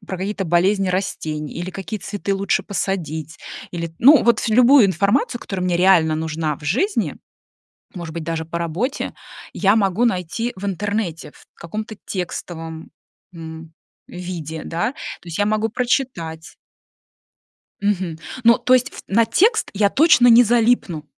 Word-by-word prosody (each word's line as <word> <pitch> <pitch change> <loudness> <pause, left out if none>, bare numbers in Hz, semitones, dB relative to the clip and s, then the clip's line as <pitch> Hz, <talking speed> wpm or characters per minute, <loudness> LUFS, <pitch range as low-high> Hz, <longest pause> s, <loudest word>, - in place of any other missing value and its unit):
про 190 - -4
какие-то 195 +1 -3
болезни 185 +3 +2
растений 155 -5 -3
или 175 +2 -5
какие 195 +3 -6
цветы 200 +1 -3
лучше 195 +1 0
посадить, 160 -6 -3 0.3
или, 170 -2 -5
ну, 280 +2 +7
вот 235 -1 +2
любую 250 +2 +6
информацию, 200 - +1
которая 190 -2 -5
мне 180 -1 +1
реально 175 -4 +4
нужна 160 -2 -2
в - - -15
жизни, 265 - 0 0.8
может 170 -4 -7
быть, 170 - -4
даже 160 0 -3
по 170 +1 -6
работе, 175 - -3 0.4
я 200 +1 +3
могу 205 +2 +2
найти 225 +3 -1
в 190 - -9
интернете 200 -3 -3
в - - -19
каком-то 215 +5 -7
текстовом, 165 -3 -6 0.4
м, 160 -1 -9 0.3
виде, 170 -3 -6
да. 175 +10 -2
То 180 - -9
есть 165 -2 -6
я 205 - +2
могу 215 +1 0
прочитать. 220 - -2 1.3
Мгм, 190 -5 -1 0.3
ну, 235 0 +6
то 255 - +3
есть 255 +1 +2
в - - -11
на 225 +3 +3
текст 425 - +2
я 200 0 +2
точно 275 -5 +5
не 235 +1 +8
залипну. 225 -9 +1
190 Hz, 145 wpm, -20 LUFS, 165-220 Hz, 1.3 s, не